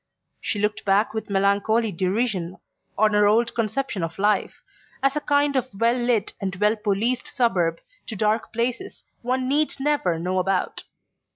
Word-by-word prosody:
She 210 - -3
looked 210 +1 -1
back 205 +2 +2
with 220 -1 -5
melancholy 200 +3 +2
derision 185 0 -1 0.4
on 215 0 +3
her 210 0 +4
old 230 +3 +2
conception 230 -1 -2
of 165 0 -4
life, 210 +2 0 0.4
as 275 +1 +2
a 300 - -1
kind 285 -1 +2
of 255 -1 +1
well 230 +1 +4
lit 240 -4 0
and 195 -1 -3
well 210 +4 +2
policed 220 +4 -1
suburb 180 -10 +1 0.3
to 220 - -5
dark 215 +2 0
places 245 - -3 0.2
one 255 +1 -1
need 295 +3 +1
never 270 - +1
know 180 +3 -1
about. 185 0 -1
215 Hz, 160 wpm, -24 LUFS, 195-245 Hz, 0.4 s, her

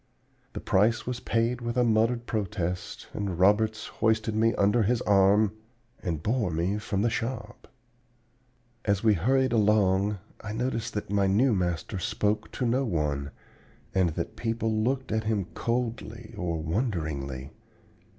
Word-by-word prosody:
"The - - -4
price 105 +3 +2
was 125 -1 -3
paid 120 0 0
with 120 +1 -3
a 125 - +4
muttered 115 +1 +2
protest 95 -5 -3
and 100 -4 -3
Roberts 105 +4 +3
hoisted 110 0 0
me 115 +1 +3
under 105 +4 +3
his 115 +3 +1
arm 100 +1 +4 0.5
and 80 -5 -3
bore 115 -3 +1
me 85 +5 -1
from 105 -1 -1
the 120 - +3
shop. 120 +4 -4 1.2
"As 100 -1 +1
we 110 -2 +5
hurried 130 +7 +2
along, 105 -2 +3 0.3
I 105 -1 -5
noticed 115 -1 -2
that 105 -1 -3
my 100 -1 +3
new 115 +6 +3
master 90 0 -1
spoke 105 +3 -1
to 125 - -2
no 125 +3 +2
one, 75 - -1 0.6
and 95 -2 +3
that - - -4
people 115 -1 -1
looked 130 +4 0
at 110 0 0
him 105 -4 0
coldly 115 -1 -3
or 90 -5 -2
wonderingly. 80 - -2
105 Hz, 145 wpm, -28 LUFS, 95-115 Hz, 1.2 s, we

